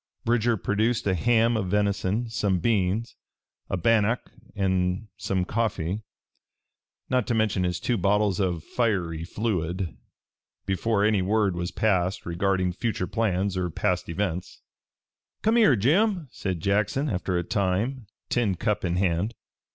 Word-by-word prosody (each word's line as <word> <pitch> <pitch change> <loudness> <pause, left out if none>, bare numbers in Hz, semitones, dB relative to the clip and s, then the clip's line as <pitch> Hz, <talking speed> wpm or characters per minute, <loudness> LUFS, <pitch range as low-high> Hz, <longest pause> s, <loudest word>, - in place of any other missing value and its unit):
Bridger 120 0 +2
produced 110 +4 0
a 95 - +2
ham 115 +5 +3
of 105 -4 -1
venison, 100 +3 0
some 105 -4 0
beans, 105 +2 0 0.5
a - - 0
bannock 115 +4 +2 0.2
and 95 +1 0
some 95 -2 -1
coffee 105 -3 -1 1.1
not 125 -3 +1
to 120 - +1
mention 105 -4 +1
his 90 -1 -1
two 120 - 0
bottles 100 0 +2
of 90 -5 0
fiery 90 -9 -1
fluid 90 -2 -2 0.7
before 100 +2 +1
any 105 -3 +3
word 100 0 +1
was 85 0 -2
passed 95 -1 0
regarding 90 +1 0
future 110 -1 -2
plans 100 -2 0
or 90 -1 -1
past 90 +2 -1
events. 90 0 -3 0.8
"Come 220 +2 +3
here, 215 - +6
Jim," 165 - +2
said 95 -4 -3
Jackson 105 +8 +1
after 90 -5 -1
a 85 - 0
time, 100 +7 -1 0.2
tin 110 -6 +1
cup 105 +4 -1
in 90 -1 0
hand. 95 +4 0
100 Hz, 135 wpm, -26 LUFS, 90-115 Hz, 1.1 s, here